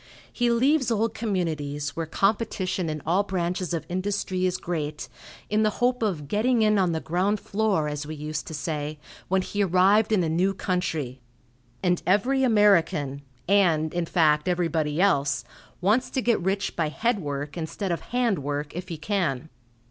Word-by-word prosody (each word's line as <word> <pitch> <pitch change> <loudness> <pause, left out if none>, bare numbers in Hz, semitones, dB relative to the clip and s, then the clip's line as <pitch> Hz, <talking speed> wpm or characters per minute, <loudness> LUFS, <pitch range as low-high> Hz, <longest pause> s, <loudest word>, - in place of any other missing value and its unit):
He 245 -1 +1
leaves 260 +4 +3
old 225 0 +1
communities, 155 - -2
where 165 -1 -3
competition 195 -2 0
in 155 -2 -4
all 175 +5 +3
branches 180 -2 -2
of 165 -2 -2
industry 185 0 -1
is 180 - -1
great, 155 -3 -4 0.4
in 210 +1 +1
the 215 - +3
hope 250 0 +1
of 175 -10 -1
"getting 225 - +2
in 215 -1 +3
on 185 -2 +2
the 160 - -1
ground 185 +6 0
floor," 195 -8 0
as 150 0 -4
we 155 - -5
used 150 0 -5
to 160 - -5
say, 150 0 -3 0.3
when 190 0 +1
he 205 +2 -1
arrived 195 +4 +4
in 200 -5 +3
a - - 0
new 180 +5 +1
country, 160 -9 -2 0.6
and 180 -1 +2
every 245 +9 +3
American, 175 - +3 0.3
and, 170 -6 +3
in 175 -1 -1
fact, 155 -3 +3
everybody 165 -4 0
else, 140 -8 +2 0.4
wants 215 +7 +2
to 260 - -1
get 235 -5 +2
rich 195 +2 -1
by 160 -3 0
head 230 +7 0
work 145 -2 -4
instead 175 +3 -3
of 170 - -2
hand 240 -7 0
work, 145 +2 -4
if 180 +1 -5
he 165 - -4
can. 160 -5 -1
180 Hz, 170 wpm, -25 LUFS, 155-205 Hz, 0.6 s, arrived